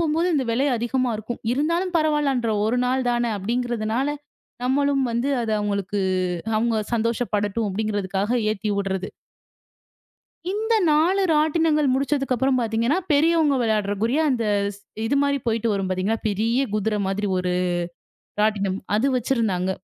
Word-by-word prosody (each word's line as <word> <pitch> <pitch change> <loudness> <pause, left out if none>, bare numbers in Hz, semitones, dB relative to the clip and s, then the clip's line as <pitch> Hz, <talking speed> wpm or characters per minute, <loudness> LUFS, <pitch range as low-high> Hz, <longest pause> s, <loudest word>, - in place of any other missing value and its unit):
போம்போது, 330 +2 +1
இந்த 265 -4 0
விலை 260 +5 +1
அதிகமா 240 +1 0
இருக்கும். 220 +2 -6
இருந்தாலும் 335 +6 0
பரவால்லன்ற. 290 -6 +1 0.2
1 245 +3 +1
நாள் 255 0 0
தானே 240 -1 0
அப்படிங்கறதுனால, 235 +3 -1 0.6
நம்மளும் 275 +1 +2
வந்து 240 +4 0
அத 225 - -2
அவுங்களுக்கு, 200 -1 -2 0.6
அவுங்க 225 0 +1 0.2
சந்தோஷப்படட்டும் 220 -2 -1
அப்படிங்குறதுக்காக 205 +2 -1
ஏத்தி 215 0 -3
உட்றது. 190 -1 -3 1.4
இந்த 440 +3 0 0.2
4 340 +6 +3
ராட்டினங்கள் 305 -1 +2
முடிச்சதுக்கப்புறம் 265 -2 +1
பாத்தீங்கன்னா, 230 +6 +1
பெரியவங்க 310 0 +3
விளையாடுவதற்குரிய, 220 +3 0
அந்த 240 -3 0 0.3
ஸ் 200 - -17 0.3
இது 260 +5 +1
மாரி 280 0 +1
போயிட்டு 230 0 0
வரும் 195 -1 -2
பாத்தீங்கன்னா, 190 +4 -1
பெரிய 225 +5 0
குதிர 215 0 0
மாதிரி 200 +2 -1
ஒரு 180 0 -1 0.9
ராட்டினம். 200 -3 +1 0.2
அது 235 +6 +2
வச்சிருந்தாங்க. 220 -7 0
235 Hz, 125 wpm, -23 LUFS, 210-280 Hz, 1.4 s, 4